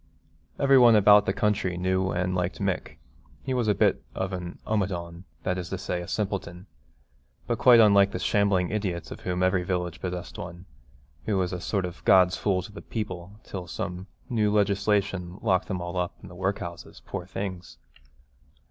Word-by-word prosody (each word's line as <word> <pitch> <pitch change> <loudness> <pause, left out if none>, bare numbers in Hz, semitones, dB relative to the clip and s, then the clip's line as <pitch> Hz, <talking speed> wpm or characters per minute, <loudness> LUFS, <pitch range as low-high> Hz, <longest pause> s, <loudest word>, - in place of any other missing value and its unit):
Every 135 -1 +5
one 120 -2 +7
about 105 0 +6
the - - +3
country 100 -3 0
knew 95 +1 0
and 90 0 -1
liked 90 0 -2
Mick. 100 -3 -2 0.5
He 130 - -2
was 125 -3 0
a 105 - +3
bit - - +2
of 95 0 -2
an 90 -1 -5
omadhaun, 90 -4 -2 0.2
that 90 0 -1
is 90 -1 -6
to 95 - -3
say 90 -1 -3
a 85 - -8
simpleton, 95 -3 -3 0.8
but - - -2
quite 125 -2 +7
unlike 100 -2 +6
the 105 - -4
shambling 100 -4 +1
idiots 95 -5 -3
of - - -7
whom 90 0 -2
every 95 0 +2
village 90 -2 -3
possessed 90 -1 -5
one, 85 +1 -8 0.6
who 105 -3 +1
was 90 -1 0
a 90 - -4
sort 95 0 -1
of 90 0 -8
God's 90 -1 +5
fool 95 -3 0
to - - -10
the 100 - -10
people, 100 -4 -5
till 90 -3 -7
some 90 +2 -5 0.2
new 110 -3 +1
legislation 100 -3 +1
locked 95 -4 +1
them 90 -4 -3
all 85 +1 -5
up 90 -1 -2
in 100 - -10
the 90 - -12
work 95 +2 -1
houses, 85 0 -9
poor 90 - -5
things! 95 -2 -6
95 Hz, 185 wpm, -26 LUFS, 90-100 Hz, 0.8 s, one